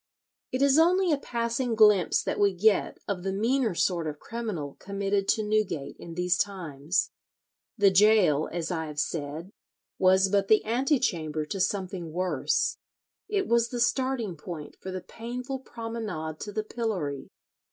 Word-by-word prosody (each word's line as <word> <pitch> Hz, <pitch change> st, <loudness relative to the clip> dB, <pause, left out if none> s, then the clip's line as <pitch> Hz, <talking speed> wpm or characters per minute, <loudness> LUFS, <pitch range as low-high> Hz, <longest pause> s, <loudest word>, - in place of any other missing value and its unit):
It 255 Hz, +2 st, +1 dB
is 280 Hz, +2 st, +5 dB
only 360 Hz, +2 st, +4 dB
a 295 Hz, -, +3 dB
passing 235 Hz, -1 st, -1 dB
glimpse 210 Hz, -5 st, +5 dB
that -, -, -2 dB
we 200 Hz, -1 st, +4 dB
get 205 Hz, +2 st, +2 dB
of 195 Hz, -3 st, -2 dB
the 190 Hz, +1 st, -2 dB
meaner 225 Hz, +1 st, +1 dB
sort 170 Hz, -2 st, +1 dB
of 150 Hz, -1 st, -4 dB
criminal 195 Hz, -10 st, -5 dB
committed 200 Hz, 0 st, -1 dB
to 220 Hz, -, +2 dB
Newgate 210 Hz, -9 st, -1 dB
in 165 Hz, -1 st, -9 dB
these 180 Hz, 0 st, +1 dB
times. 170 Hz, -5 st, -1 dB, 0.7 s
The 200 Hz, -2 st, +5 dB
gaol, 190 Hz, -6 st, +4 dB
as 170 Hz, +1 st, -3 dB
I 160 Hz, -2 st, -2 dB
have 150 Hz, -1 st, -5 dB
said, 160 Hz, +5 st, -3 dB, 0.5 s
was 190 Hz, +1 st, +5 dB
but 195 Hz, 0 st, +1 dB
the 215 Hz, +1 st, +4 dB
antechamber 220 Hz, -, 0 dB
to 195 Hz, +6 st, -5 dB
something 185 Hz, -3 st, -2 dB
worse. 180 Hz, -5 st, 0 dB, 0.5 s
It 395 Hz, -2 st, 0 dB
was 235 Hz, 0 st, +2 dB
the 245 Hz, -, -4 dB
starting 240 Hz, -5 st, 0 dB
point 150 Hz, -1 st, -8 dB
for 190 Hz, -, -6 dB
the 185 Hz, 0 st, -4 dB
painful 250 Hz, +6 st, -6 dB
promenade 220 Hz, -11 st, -5 dB
to 205 Hz, -, -6 dB
the 215 Hz, +1 st, -2 dB
pillory. 200 Hz, -, -3 dB
200 Hz, 155 wpm, -27 LUFS, 170-230 Hz, 0.7 s, is